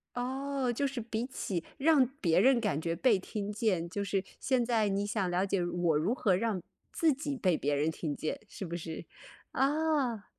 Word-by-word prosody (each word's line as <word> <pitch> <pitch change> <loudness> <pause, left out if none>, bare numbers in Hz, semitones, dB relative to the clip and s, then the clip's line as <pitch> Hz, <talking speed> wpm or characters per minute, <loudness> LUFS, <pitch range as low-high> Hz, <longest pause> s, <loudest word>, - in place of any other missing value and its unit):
哦， 265 +1 -1
就 280 +4 0
是 270 -3 -3
比 225 +1 -3
起 195 -9 -3
让 285 -2 +5
别 165 -3 +3
人 250 +5 +5
感 200 -10 0
觉 165 +1 -1
被 210 +4 +3
听 205 +2 -4
见， 200 -6 0
就 200 +3 -3
是 195 -1 0 0.2
现 260 -2 +1
在 225 -3 +2
你 200 +1 0
想 205 -2 -1
了 180 +2 +1
解 190 -2 0
我 175 -2 +1
如 170 +10 +1
何 205 -8 +2
让 205 -3 -1 0.3
自 325 -3 +3
己 285 +1 -3
被 185 -9 +2
别 145 0 0
人 150 +3 +1
听 155 -2 -3
见， 155 - -3
是 200 - -7
不 170 -1 -4
是？ 165 -1 -6 0.5
啊。 275 -6 +1
210 Hz, 210 characters per minute, -31 LUFS, 175-260 Hz, 0.5 s, 让